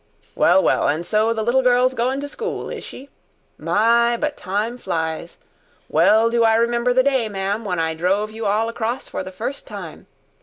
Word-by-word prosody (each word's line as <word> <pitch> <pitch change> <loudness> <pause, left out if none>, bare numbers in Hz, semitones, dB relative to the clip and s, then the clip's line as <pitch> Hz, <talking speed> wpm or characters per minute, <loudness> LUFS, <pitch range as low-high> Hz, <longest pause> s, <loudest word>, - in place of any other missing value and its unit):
"Well, 285 - +4
well, - - +2
and 155 +4 -1
so 215 +3 +1
the 220 -1 -1
little 240 +4 +2
girl's 250 0 +3
goin' 255 +2 -1
to 285 - -4
school, 455 +10 -5
is - - -6
she? 275 +2 -11 0.5
My, 235 +2 +2
but 300 +3 -2
time 210 +6 -3
flies! 160 -3 -4 0.5
Well 225 +2 +4
do 235 -1 +2
I 225 -1 +4
remember 235 +1 +1
the 255 +1 +3
day 260 -5 +1
ma'am, 200 +2 -2
when 180 -3 -2
I 160 0 0
drove 195 +6 0
you 220 -1 -4
all 215 +3 +1
across 230 +2 -3
for - - -5
the 185 - -8
first 230 +9 -5
time. - - -9
230 Hz, 190 wpm, -21 LUFS, 200-245 Hz, 0.5 s, Well